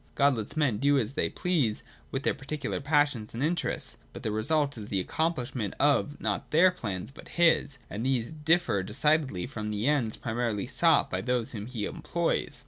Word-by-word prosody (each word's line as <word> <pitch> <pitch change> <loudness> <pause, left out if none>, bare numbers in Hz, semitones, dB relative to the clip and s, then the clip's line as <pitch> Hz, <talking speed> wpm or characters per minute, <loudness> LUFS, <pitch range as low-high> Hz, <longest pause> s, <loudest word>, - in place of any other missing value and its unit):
God 140 -1 +4
lets 110 +6 -4
men 130 -9 +2
do 140 +1 +3
as 120 -1 0
they 155 - 0
please 150 -12 0 0.3
with 135 0 -3
their - - +2
particular 145 +2 -4
passions 145 -6 +1
and 120 - -2
interests; 170 +3 +1 0.2
but - - -9
the 110 - -1
result 145 +6 +1
is 105 -3 -7
the 95 -3 -1
accomphshment 125 - -2
of^not 145 0 +1
their 180 +4 +5
plans, 100 - -5
but - - -13
His, 165 -4 +4
and 105 +3 -5
these 125 -3 0
differ 160 - +2
decidedly 130 - +1
from 105 -1 -5
the 105 +1 -2
ends 135 -7 +1
primarily 115 -3 -2
sought 160 +4 +3
by 95 - -1
those 125 0 0
whom 105 -2 -6
He 120 -4 -3
employs. - - -2
130 Hz, 180 wpm, -28 LUFS, 110-150 Hz, 0.3 s, their